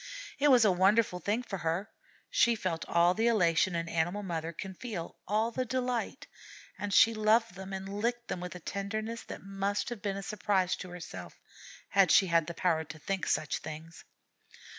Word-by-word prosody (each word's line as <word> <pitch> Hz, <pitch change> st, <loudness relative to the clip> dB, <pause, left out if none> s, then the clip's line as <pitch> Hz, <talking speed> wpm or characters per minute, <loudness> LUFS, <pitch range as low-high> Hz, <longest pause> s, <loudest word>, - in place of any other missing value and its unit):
It 290 Hz, -, +4 dB
was 245 Hz, -4 st, +6 dB
a 205 Hz, -, +5 dB
wonderful 190 Hz, +1 st, +3 dB
thing 210 Hz, +7 st, -1 dB
for 195 Hz, -5 st, -5 dB
her. 170 Hz, +6 st, -2 dB, 0.4 s
She 235 Hz, 0 st, +4 dB
felt 185 Hz, -6 st, -3 dB
all 170 Hz, +1 st, +4 dB
the 225 Hz, +4 st, +1 dB
elation 180 Hz, -5 st, +3 dB
an 165 Hz, 0 st, -2 dB
animal 175 Hz, +5 st, -1 dB
mother 165 Hz, -3 st, -3 dB
can 190 Hz, +3 st, -7 dB
feel, 190 Hz, -4 st, -6 dB
all 215 Hz, +4 st, +1 dB
the 255 Hz, +2 st, -1 dB
delight, 250 Hz, -1 st, -2 dB, 0.5 s
and 205 Hz, -, -3 dB
she 225 Hz, +3 st, +6 dB
loved 220 Hz, 0 st, +3 dB
them 190 Hz, +1 st, -8 dB
and 190 Hz, 0 st, -5 dB
licked 235 Hz, +4 st, -2 dB
them -, -, -3 dB
with 180 Hz, 0 st, -6 dB
a -, -, -7 dB
tenderness 215 Hz, +5 st, -4 dB
that -, -, -8 dB
must 195 Hz, +2 st, -2 dB
have 240 Hz, -4 st, -6 dB
been 200 Hz, -2 st, -2 dB
a 195 Hz, -, -5 dB
surprise 195 Hz, -3 st, 0 dB
to 185 Hz, -, -8 dB
herself, 175 Hz, -1 st, -9 dB, 0.5 s
had 195 Hz, -3 st, +4 dB
she 195 Hz, -, +6 dB
had 165 Hz, -3 st, +2 dB
the 170 Hz, -, -5 dB
power 165 Hz, -3 st, +1 dB
to 155 Hz, 0 st, -10 dB
think 190 Hz, +4 st, -3 dB
of -, -, 0 dB
such -, -, 0 dB
things. 160 Hz, +1 st, -9 dB
195 Hz, 195 wpm, -31 LUFS, 175-220 Hz, 0.5 s, was